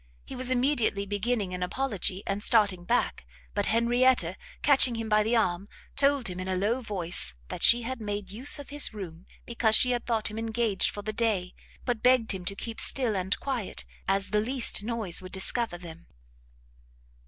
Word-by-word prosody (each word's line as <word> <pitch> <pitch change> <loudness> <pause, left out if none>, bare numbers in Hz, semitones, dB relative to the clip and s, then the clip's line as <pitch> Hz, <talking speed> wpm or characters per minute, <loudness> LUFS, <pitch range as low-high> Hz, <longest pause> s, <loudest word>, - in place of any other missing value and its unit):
He - - -8
was 255 0 -1
immediately 245 -6 +1
beginning 205 -1 -2
an 180 - -5
apology, 200 -1 -1
and 200 +1 -2
starting 205 -6 +3
back, - - 0 0.3
but - - -1
Henrietta 235 -5 +2 0.3
catching 270 -4 +5
him 225 -1 -4
by 215 0 +3
the 225 +3 0
arm, 195 -2 0 0.3
told 280 -2 +2
him 180 -1 -3
in 185 - -5
a 190 - -1
low 215 +7 0
voice, 175 - -2
that - - -6
she 240 0 +6
had 255 0 -5
made 205 -2 -5
use 250 +10 +2
of 285 - -9
his 290 -6 0
room 175 -3 -9 0.2
because 230 -2 +2
she 250 - +5
had 245 -1 -2
thought 225 -3 0
him 215 - -6
engaged 225 -3 0
for 205 - -7
the 215 +1 -4
day, 210 -5 -1 0.3
but 240 -4 -2
begged 250 -3 +3
him 190 -3 -4
to 195 - -2
keep 225 +2 -5
still 245 -6 +2
and 190 +1 -1
quiet, 255 -7 -3 0.2
as 195 0 0
the 210 0 +2
least 245 -1 +2
noise 215 -6 -1
would 185 0 -10
discover 195 +1 0
them. 170 -1 -12
215 Hz, 190 wpm, -27 LUFS, 190-240 Hz, 0.3 s, she